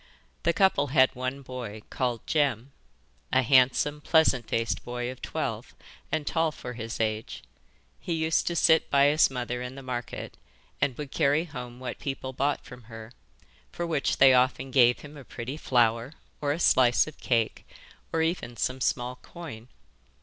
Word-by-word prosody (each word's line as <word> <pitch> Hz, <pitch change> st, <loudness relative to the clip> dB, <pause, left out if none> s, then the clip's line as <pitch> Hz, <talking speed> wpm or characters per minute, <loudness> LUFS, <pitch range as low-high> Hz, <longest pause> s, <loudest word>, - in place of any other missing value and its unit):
The 170 Hz, -, +2 dB
couple 170 Hz, -6 st, +3 dB
had 130 Hz, -1 st, +4 dB
one 130 Hz, +2 st, -4 dB
boy 120 Hz, -5 st, -7 dB
called 120 Hz, -3 st, -2 dB
Jem. 140 Hz, -4 st, 0 dB, 0.6 s
A 130 Hz, 0 st, +3 dB
handsome, 130 Hz, +3 st, +3 dB
pleasant 145 Hz, -7 st, +3 dB
faced 115 Hz, -5 st, -1 dB
boy 120 Hz, 0 st, -4 dB
of 130 Hz, -, -12 dB
twelve, -, -, -4 dB, 0.4 s
and 155 Hz, -2 st, -1 dB
tall 160 Hz, +1 st, +1 dB
for 125 Hz, -4 st, -8 dB
his 115 Hz, -1 st, -6 dB
age. 110 Hz, -, -2 dB, 0.6 s
He 170 Hz, -, -3 dB
used 160 Hz, -1 st, +1 dB
to 170 Hz, -, 0 dB
sit 160 Hz, -1 st, +4 dB
by 140 Hz, 0 st, +5 dB
his 155 Hz, +2 st, +4 dB
mother 125 Hz, -1 st, -4 dB
in 125 Hz, +1 st, -6 dB
the 135 Hz, -, -9 dB
market 125 Hz, -2 st, -5 dB, 0.4 s
and 130 Hz, -4 st, +1 dB
would 145 Hz, -2 st, -6 dB
carry 145 Hz, +3 st, +2 dB
home 125 Hz, -6 st, -8 dB
what 130 Hz, -, -6 dB
people 135 Hz, -1 st, -5 dB
bought 140 Hz, +3 st, -1 dB
from 125 Hz, -3 st, -12 dB
her, 115 Hz, 0 st, -10 dB, 0.6 s
for 175 Hz, -, -4 dB
which 155 Hz, -5 st, 0 dB
they 135 Hz, -1 st, +7 dB
often 130 Hz, +1 st, +2 dB
gave 125 Hz, -2 st, +4 dB
him 150 Hz, 0 st, -11 dB
a 140 Hz, -, -10 dB
pretty 125 Hz, +2 st, -6 dB
flower, 120 Hz, -2 st, +1 dB, 0.3 s
or 145 Hz, -1 st, 0 dB
a 155 Hz, -, -2 dB
slice 125 Hz, -7 st, +4 dB
of 155 Hz, -, -11 dB
cake, 115 Hz, -4 st, 0 dB, 0.5 s
or 160 Hz, 0 st, +1 dB
even 160 Hz, -8 st, -2 dB
some 130 Hz, +4 st, -2 dB
small 125 Hz, 0 st, -1 dB
coin. 135 Hz, -11 st, -10 dB
130 Hz, 170 wpm, -27 LUFS, 120-145 Hz, 0.6 s, they